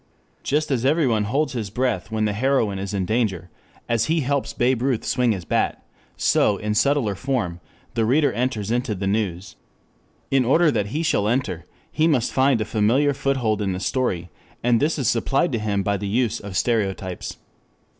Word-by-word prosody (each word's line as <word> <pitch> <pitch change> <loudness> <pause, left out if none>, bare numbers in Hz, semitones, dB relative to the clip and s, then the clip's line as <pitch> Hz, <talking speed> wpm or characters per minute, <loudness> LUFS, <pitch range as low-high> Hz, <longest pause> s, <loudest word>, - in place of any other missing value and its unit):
Just 150 +1 0
as 125 -3 0
everyone 130 -7 +2
holds 140 +8 0
his 110 -5 -3
breath 125 +1 -1
when 110 -1 0
the 105 - 0
heroine 115 -4 +1
is 95 0 -4
in 95 -3 -1
danger, 95 -5 -1 0.4
as 115 -1 +1
he 160 0 +1
helps 140 0 -1
Babe 120 0 +1
Ruth 130 -3 0
swing 125 -2 +2
his 95 -5 -3
bat, - - -1 0.3
so 100 - +3
in 105 +1 -2
subtler 135 -2 +2
form 105 -7 -2 0.3
the 115 -2 +1
reader 140 +4 +3
enters 115 -4 -2
into 120 -2 0
the 95 +1 -4
news. 100 -3 -2 0.7
In 135 -1 +4
order 155 +6 +4
that 105 -5 -1
he 150 +10 -2
shall 105 -10 +1
enter 105 -8 -1 0.3
he 160 +1 +2
must 130 -8 +1
find 130 -2 +3
a 110 - -1
familiar 115 +7 +2
foothold 125 -6 0
in 95 -2 -1
the 90 - -4
story, 95 -7 -1 0.3
and 120 -1 +3
this 155 +3 +1
is 135 -6 -1
supplied 135 +7 +1
to 115 - -1
him 100 -2 -1
by 100 +1 0
the 100 - -4
use 115 +2 0
of 100 -2 -5
stereotypes. 95 -6 -1
115 Hz, 185 wpm, -23 LUFS, 100-135 Hz, 0.7 s, In